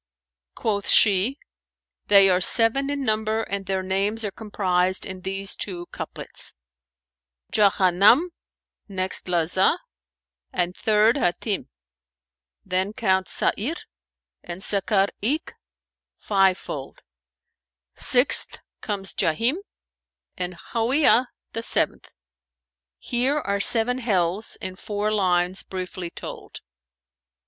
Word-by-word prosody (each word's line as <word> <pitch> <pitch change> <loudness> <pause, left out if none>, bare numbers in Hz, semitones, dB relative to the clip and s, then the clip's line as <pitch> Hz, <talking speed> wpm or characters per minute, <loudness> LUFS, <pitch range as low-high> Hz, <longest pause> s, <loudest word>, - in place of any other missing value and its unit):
Quoth 205 -2 -2
she, 210 +6 +4 0.7
"They 200 -1 +7
are 185 -1 +2
seven 235 +8 +4
in 285 -1 -3
number 220 0 0
and 200 -2 -5
their 190 -1 -1
names 200 +4 -1
are 205 - -3
comprised 185 -4 -1
in 185 -1 -7
these 195 +1 -3
two 175 -3 -5
couplets, - - -4 1.0
'Jahannam, 200 - +4 0.6
next 190 -2 -1
Lazα, 180 +2 +2 0.7
and 180 +1 -1
third 215 +3 +2
Hatνm; 195 -1 -1 0.5
* 65 0 -58
Then 190 +3 0
count 190 -4 0
Sa'νr 270 +11 -1 0.7
and 175 +2 -7
Sakar 200 -1 +1
eke, 275 +10 -1 0.6
five 195 -2 +2
fold, 135 -2 -8 0.9
Sixth 250 +2 +2 0.2
comes 195 -3 -4
Jahνm 230 - +1 0.8
and 180 0 -4 0.2
Hαwiyah 250 +2 +3 0.3
the 225 - -3
seventh; - - -1 0.5
* 60 -1 -68 0.2
Here 255 +4 0
are 200 -8 -2
seven 235 +4 +5
Hells 195 -3 -1
in 185 - -6
four 210 +1 -3
lines 185 -2 +1
briefly 185 -1 -6
told.'" - - -9
200 Hz, 105 wpm, -23 LUFS, 185-225 Hz, 1.0 s, They